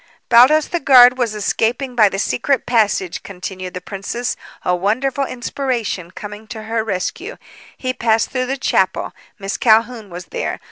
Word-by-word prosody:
"Baldos, 260 +6 +6
the 345 - -1
guard, 255 -3 +7
was 230 -3 0
escaping 230 +5 -1
by 215 -4 +5
the 195 - -4
secret 250 +6 0
passage," 210 -6 +1
continued 185 -1 -7
the 180 - -5
princess, 205 +7 -4 0.3
a 180 - +2
wonderful 250 +9 0
inspiration 240 -8 -3
coming 210 +3 -9
to 220 -1 -8
her 225 0 -2
rescue. 225 - -4 0.4
"He 255 -1 -2
passed 225 -2 +1
through 255 -1 -1
the 270 +2 -2
chapel. 265 - 0 0.2
Miss 195 -1 -4
Calhoun 225 -1 +2
was 175 0 -8
there. - - -3
225 Hz, 155 wpm, -18 LUFS, 200-255 Hz, 0.4 s, guard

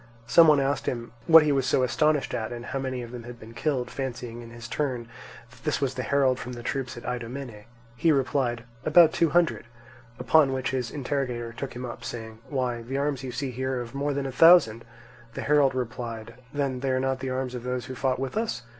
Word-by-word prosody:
Some 160 +8 +7
one 150 -2 +6
asked 140 +1 -1
him 120 -1 -3 0.2
what 160 -1 +9
he 150 - +2
was 135 -2 +1
so 130 - +3
astonished 145 +4 +1
at, 110 +1 -3
and 120 0 -6
how 135 - -3
many 130 -2 -3
of 120 - -9
them 125 -1 -7
had 120 0 -10
been 115 +1 -12
killed, 130 0 -1
fancying 120 -3 -5
in 115 - -10
his 115 0 -9
turn 125 -4 -2 0.4
that - - -18
this 150 - 0
was 135 -2 0
the 130 - -3
herald 130 -1 +2
from 125 - -6
the 120 -1 -8
troops 130 -1 -3
at 120 - -9
Idomene. 120 -2 -5 0.3
He 160 +7 +3
replied: 130 -4 0 0.2
"About 160 +1 +6
two 165 - +2
hundred"; 170 -4 +2 0.5
upon 135 +3 +4
which 130 0 -2
his 130 -2 -2
interrogator 125 -4 -3
took 130 +1 -6
him 125 +1 -5
up, 120 - -8
saying: 110 -2 -7
"Why, 125 -4 -1
the 130 +4 -4
arms 140 -1 -1
you 130 - -4
see 135 +1 -3
here 130 +1 -2
are - - -2
of 120 0 -8
more 140 +1 -1
than 140 -1 -2
a 135 - -3
thousand." 125 -7 +6 0.5
The - - -3
herald 140 -3 +3
replied: 120 -3 -5 0.2
"Then 140 -3 -1
they 135 +1 -2
are 130 0 +1
not 130 0 -1
the 130 0 -4
arms 130 0 -2
of 125 - -5
those 125 0 -3
who 130 - -7
fought 130 0 0
with 135 +5 -4
us?" 220 - -2
130 Hz, 230 wpm, -26 LUFS, 120-140 Hz, 0.5 s, what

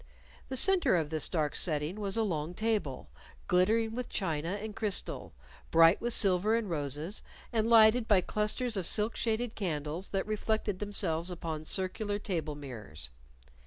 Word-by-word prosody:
The 260 - -2
center 380 - +4
of 160 -3 -1
this 155 -2 +4
dark 155 -4 -1
setting 155 +3 0
was 200 0 -1
a 225 - +2
long 165 -4 -3
table, 215 - -2 0.4
glittering 220 +5 +2
with 250 +1 -5
china 165 -2 -2
and 215 0 -7
crystal, 210 - +1 0.3
bright 165 +3 +5
with 240 - -1
silver 200 0 +3
and 230 -2 -1
roses, 150 +3 -4 0.3
and 225 0 +1
lighted 225 +1 +6
by 205 -4 +5
clusters 215 +5 -1
of 185 -4 -2
silk 215 +1 +3
shaded 230 0 -1
candles 160 -1 -4
that 195 -1 -2
reflected 215 -2 -2
themselves 185 -5 -2
upon 160 -3 -5
circular 205 +4 -1
table 165 -7 -3
mirrors. 105 - -8
190 Hz, 155 wpm, -30 LUFS, 160-220 Hz, 0.4 s, lighted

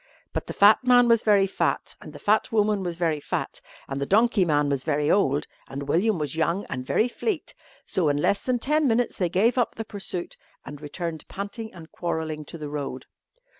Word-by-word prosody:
But - - -3
the - - -5
fat 205 +2 +6
man 245 -1 +5
was 230 -1 +4
very 205 -2 +4
fat, 195 - -1
and - - -10
the - - -10
fat 215 +1 +1
woman 210 -2 +2
was 175 -2 -4
very 165 -3 0
fat, - - -4 0.3
and 135 0 -4
the 140 - -1
donkey 220 -1 +3
man 145 -3 +2
was 140 -2 -1
very 150 -1 +1
old, 150 -6 +2 0.2
and 140 +1 -6
William 205 +3 +2
was 150 -1 -2
young 170 +4 0
and 130 -1 -3
very 215 - +2
fleet, 350 - -3 0.3
so 175 -5 +1
in 145 - +1
less 200 +7 +1
than 255 -1 +1
ten 300 +5 +1
minutes 240 0 +1
they 180 -3 +1
gave 225 +8 +2
up 240 - 0
the 225 - -5
pursuit 195 -4 -5 0.3
and 145 +1 -9
returned 160 +1 -5
panting 210 +3 -6
and 165 -3 -13
quarrelling 160 -3 -3
to 165 - -7
the 150 -2 -6
road. 140 -3 -5
180 Hz, 210 wpm, -25 LUFS, 150-220 Hz, 0.3 s, fat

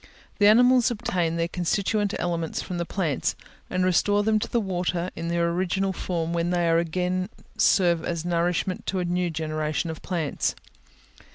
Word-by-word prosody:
The 205 - +6
animals 245 +3 +6
obtain 180 -8 -1
their 165 0 0
constituent 200 +4 0
elements 170 -2 -2
from 180 -2 -4
the 170 - -2
plants, 165 -8 -1 0.3
and 185 0 0
restore 205 +3 +3
them 215 0 +2
to - - -4
the 235 - +1
water 180 -3 -2
in 165 +1 -4
their 170 0 +1
original 190 +2 0
form, 170 -3 -2
when 170 0 0
they 175 -1 +1
again 180 +3 0 0.3
serve 175 -4 +3
as 170 -1 -3
nourishment 175 +1 -1
to 190 - -1
a 180 - 0
new 175 0 0
generation 155 +1 -2
of 160 - -9
plants. 165 -6 -1
175 Hz, 165 wpm, -25 LUFS, 170-190 Hz, 0.3 s, The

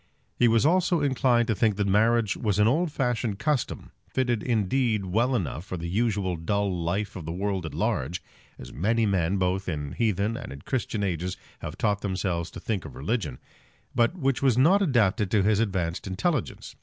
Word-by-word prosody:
He 120 - +4
was 115 +2 +3
almost 180 +3 +3
inclined 130 -7 +2
to 110 - +2
think 110 0 +2
that 100 0 0
marriage 110 +2 +3
was 105 -4 -1
an 105 +1 +4
old 160 +7 +1
fashioned 120 -6 -1
custom, 135 +4 -2 0.2
fitted 120 -4 0
indeed 115 -1 +1
well 115 +8 +1
enough 85 - -2
for 95 -1 -5
the 85 0 -5
usual 100 -2 0
dull 100 +3 0
life 90 +5 -2
of 90 -5 -7
the - - -2
world 95 -1 -2
at 75 - -8
large, 85 +8 -1 0.4
as - - -10
many 110 +7 +1
men 95 -2 +1
both 95 +1 0
in 75 -4 -3
heathen 110 - 0
and - - -7
in 70 +1 -9
Christian 115 -4 -2
ages 90 -1 -2 0.2
have - - -7
taught 105 -2 0
themselves 90 -3 -2
to - - -9
think 105 -5 -2
of - - -10
religion, 75 - -2 0.6
but 120 +9 +2
which 135 -5 0
was 130 -4 +3
not 175 +10 +5
adapted 110 - +2
to 105 -1 +3
his 105 0 +3
advanced 95 -5 -1
intelligence. 120 - -2
105 Hz, 190 wpm, -26 LUFS, 95-120 Hz, 0.6 s, not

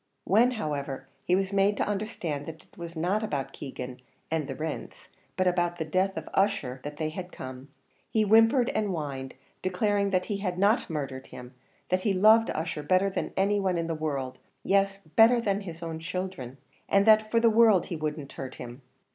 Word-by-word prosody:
When, 225 +6 +4
however, 140 -7 -3 0.2
he 180 - +3
was 195 +1 -1
made 200 +1 +3
to - - 0
understand 195 -8 -3
that 160 -1 -8
it - - -27
was 170 -2 -8
not 180 +6 0
about 145 -11 -3
Keegan 125 -2 -7 0.3
and 160 -3 0
the - - -5
rents, 155 -1 -6 0.3
but 185 - +2
about 175 -1 +1
the 160 - -2
death 185 +4 0
of - - -5
Ussher 195 -11 +1
that 145 0 -6
they 155 0 -1
had 180 +3 -7
come, 130 +1 -8 0.4
he 220 - +2
whimpered 225 +4 +5
and 215 -1 0
whined, 140 -7 -4 0.3
declaring 200 +2 +1
that 185 -1 +1
he 205 - -2
had 185 -3 -3
not 205 +4 +2
murdered 135 -4 -4
him; 125 +1 -11 0.4
that 185 0 +1
he 200 0 +1
loved 220 +4 +6
Ussher 160 -1 -3
better 185 +6 +2
than - - -3
any 200 +2 +2
one 190 -3 0
in 165 - -1
the 165 - -2
world 140 -5 -3 0.2
yes, 195 0 +2 0.2
better 230 +2 +7
than 205 -3 0
his 170 -3 -8
own 165 -1 -4
children 165 -7 -5 0.3
and 200 0 +4
that 215 0 +5
for 230 - +3
the 230 - +4
world 220 -5 +5
he 175 - -5
would 155 -1 -2
not 140 -2 -8
hurt 130 -1 -7
him. 125 +2 -9
180 Hz, 200 wpm, -28 LUFS, 150-200 Hz, 0.4 s, better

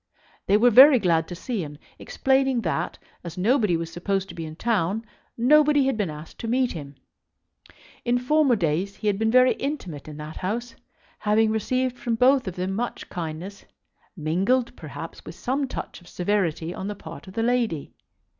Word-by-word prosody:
They 200 - +5
were 240 +3 +5
very 265 +4 +9
glad 170 -6 +2
to 175 - -6
see 210 +2 -3
him, 145 -1 -8 0.2
explaining 265 -2 +1
that, 170 -6 -2 0.3
as 170 -1 -8
nobody 210 -2 +2
was 165 0 -5
supposed 195 +2 -2
to - - -8
be 165 -1 -6
in 155 - -9
town, 215 +1 0 0.3
nobody 290 +3 +5
had 265 -2 +1
been 205 -5 -1
asked 150 +1 -10
to 230 - -4
meet 250 +2 +1
him. 145 -3 -8 1.1
In 240 0 +2
former 275 +1 +3
days 180 +1 -1
he - - -10
had 205 -1 +1
been 220 0 +2
very 255 +2 +5
intimate 195 - -5
in 150 -1 -8
that 150 +1 -8
house, 230 +5 -3 0.5
having 215 +1 +2
received 255 +3 -1
from 235 -4 -1
both 255 +1 +4
of 180 - -4
them 185 +1 -2
much 235 +4 -4
kindness, 175 +3 -6 0.5
mingled, 195 +11 +1
perhaps, - - -9
with - - -9
some 270 +2 -1
touch 250 - -7
of 175 - -18
severity 175 -4 -1
on 190 - -5
the 210 - -4
part 165 -1 -10
of 190 - -11
the 225 - 0
lady. 235 - 0
210 Hz, 185 wpm, -25 LUFS, 170-250 Hz, 1.1 s, very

